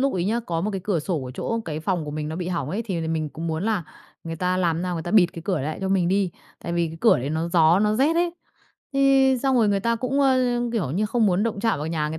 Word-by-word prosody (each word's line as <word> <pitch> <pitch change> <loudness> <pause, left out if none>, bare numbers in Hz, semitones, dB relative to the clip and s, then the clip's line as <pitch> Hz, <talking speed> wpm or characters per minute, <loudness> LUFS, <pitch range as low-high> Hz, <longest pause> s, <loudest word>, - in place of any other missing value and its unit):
lúc 275 +1 +2
ấy 175 -1 -1
nhá, 230 +4 0
có 165 -1 -1
một 210 +4 -1
cái 195 -2 -4
cửa 190 -6 0
sổ 160 -2 -2
ở 125 - -6
chỗ 230 0 -2
cái 155 -1 -4
phòng 175 -1 -1
của 150 - -5
mình 150 0 -4
nó 160 - -4
bị 180 0 -3
hỏng 155 -5 -2
ấy 215 +5 -2
thì 185 -6 -3
là 160 - -3
mình 155 -2 -1
cũng 165 +3 -6
muốn 160 +2 -2
là 220 -5 0 0.4
người 165 0 -5
ta 180 +2 0
làm 170 -2 0
nào 180 -1 -2
người 165 - -3
ta 175 - -5
bịt 200 -5 +6
cái 165 - -8
cửa 180 -7 0
lại 155 +3 -3
cho 190 - -2
mình 185 -3 +2
đi. 195 -1 +1 0.3
Tại 170 - -4
vì 170 0 +1
cái 160 - -9
cửa - - +5
đấy 135 +4 -3
nó 160 +2 -1
gió, 165 +1 +5
nó 210 +1 +2
rét 290 +6 +3
ấy. 345 0 +2 0.6
Thế 270 -1 +4
xong 265 -2 +2
rồi 225 -3 +4
người 200 -1 +1
ta 230 +2 +1
cũng, 260 +4 -1
ơ, 270 -2 +4 0.4
kiểu 195 - -1
như 205 +7 0
không 225 0 +2
muốn 185 +2 +2
động 220 -3 -2
chạm 225 -8 +1
vào 150 - -4
nhà 155 -2 -1
người 160 - -5
180 Hz, 310 wpm, -24 LUFS, 160-220 Hz, 0.6 s, bịt